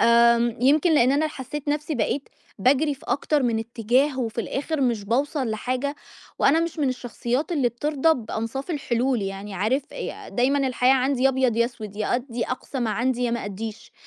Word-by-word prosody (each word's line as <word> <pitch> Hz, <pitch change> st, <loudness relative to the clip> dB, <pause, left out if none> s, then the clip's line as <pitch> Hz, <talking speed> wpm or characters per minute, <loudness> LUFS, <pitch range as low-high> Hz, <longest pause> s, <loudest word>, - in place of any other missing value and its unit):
آمم 235 Hz, 0 st, +5 dB
يمكن 300 Hz, +6 st, +4 dB
لإن 255 Hz, -2 st, +5 dB
أنا 295 Hz, +3 st, +2 dB
حسّيت 285 Hz, +1 st, -6 dB
نَفْسي 300 Hz, +1 st, -1 dB
بقيت 270 Hz, +3 st, -1 dB, 0.3 s
باجري 280 Hz, +7 st, +3 dB
في 270 Hz, -, -18 dB
أكتر 290 Hz, 0 st, +1 dB
من 230 Hz, -3 st, +1 dB
اتّجاه 240 Hz, +5 st, +1 dB
وفي 230 Hz, -1 st, -2 dB
الآخِر 285 Hz, +6 st, -3 dB
مش 235 Hz, -6 st, +1 dB
باوصل 260 Hz, +3 st, 0 dB
لحاجة 255 Hz, +6 st, -2 dB, 0.4 s
وأنا 315 Hz, +4 st, +4 dB
مش 335 Hz, -1 st, -3 dB
من 285 Hz, -, +2 dB
الشخصيات 250 Hz, +4 st, -2 dB
اللي 275 Hz, -7 st, +2 dB
بترضى 295 Hz, +6 st, +1 dB
بأنصاف 230 Hz, +5 st, -4 dB
الحلول، 255 Hz, -5 st, 0 dB
يعني 195 Hz, +1 st, -5 dB
عارف 220 Hz, +9 st, +1 dB
ي -, -, -4 dB, 0.2 s
دايمًا 270 Hz, +3 st, +2 dB
الحياة 255 Hz, 0 st, +3 dB
عندي 260 Hz, 0 st, +1 dB
يا 270 Hz, -, +6 dB
أبيض 260 Hz, -3 st, +1 dB
يا 235 Hz, -, +4 dB
أسود، 220 Hz, -4 st, -7 dB
يا 215 Hz, -, 0 dB
أدّي 245 Hz, -1 st, -2 dB
أقصى 255 Hz, +2 st, -4 dB
ما 230 Hz, -2 st, 0 dB
عندي 250 Hz, +2 st, 0 dB
يا 240 Hz, -, +1 dB
ما 235 Hz, -, -2 dB
أدّيش. 215 Hz, +2 st, -7 dB
255 Hz, 185 wpm, -24 LUFS, 235-280 Hz, 0.4 s, يا